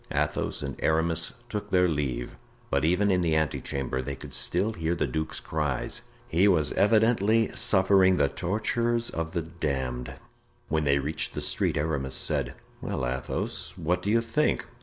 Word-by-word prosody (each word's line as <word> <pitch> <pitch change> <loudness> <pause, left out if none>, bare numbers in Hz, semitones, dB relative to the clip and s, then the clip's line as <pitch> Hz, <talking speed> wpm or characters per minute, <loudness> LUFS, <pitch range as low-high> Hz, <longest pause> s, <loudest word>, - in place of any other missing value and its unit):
Athos - - -1
and 70 -1 -4
Aramis 80 +1 +1 0.2
took 105 -4 -5
their 90 -1 +4
leave, 70 -7 -2 0.4
but 70 +1 +1
even 90 +5 +3
in 90 -1 +2
the 80 -2 +1
ante 80 -2 0
chamber 65 -1 -3
they 70 +1 -4
could - - -11
still 100 +6 +1
hear 85 -2 -1
the - - 0
duke's 80 0 -3
cries; 75 -5 -2 0.3
he 90 +5 +3
was 80 -7 +3
evidently 110 +1 +3
suffering 95 -1 +4
the - - +3
tortures 115 - -1
of 80 0 -4
the 85 -2 -1
damned. 65 -7 -3 0.5
When 80 0 +1
they 70 0 +4
reached 75 +3 -2
the - - -3
street, - - 0
Aramis 70 -4 -1
said: - - +1 0.3
"Well, 65 - -2
Athos, 65 +1 -3
what 90 +3 0
do 100 - -2
you 115 +2 +4
think?" 115 +7 0
80 Hz, 165 wpm, -27 LUFS, 70-100 Hz, 0.5 s, their